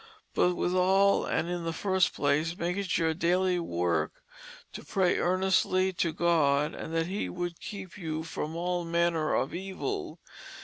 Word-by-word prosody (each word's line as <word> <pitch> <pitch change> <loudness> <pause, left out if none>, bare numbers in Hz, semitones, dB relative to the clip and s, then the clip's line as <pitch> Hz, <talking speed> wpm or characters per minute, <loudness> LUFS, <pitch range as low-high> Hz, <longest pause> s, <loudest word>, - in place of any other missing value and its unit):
But 180 0 +2
with 175 - 0
all 190 +2 +4
and 165 - 0
in 175 -1 -3
the 165 - -2
first 190 +2 +1
place 150 +4 +1
make 175 +1 -1
it 195 -4 -1
your 160 -1 +1
dayly 180 +2 +1
work 85 - -1 0.5
to - - -7
pray 185 -2 +1
earnestly 185 +1 +2
to 170 -1 0
God 150 -4 +2
that 165 0 -2
he 195 +4 -3
would 175 -1 -4
keep 195 -1 -8
you 160 -2 -3
from 160 -1 -5
all 175 +1 -1
manner 170 -2 +1
of 135 - -1
evil. 195 - -4
175 Hz, 160 wpm, -29 LUFS, 165-185 Hz, 0.5 s, all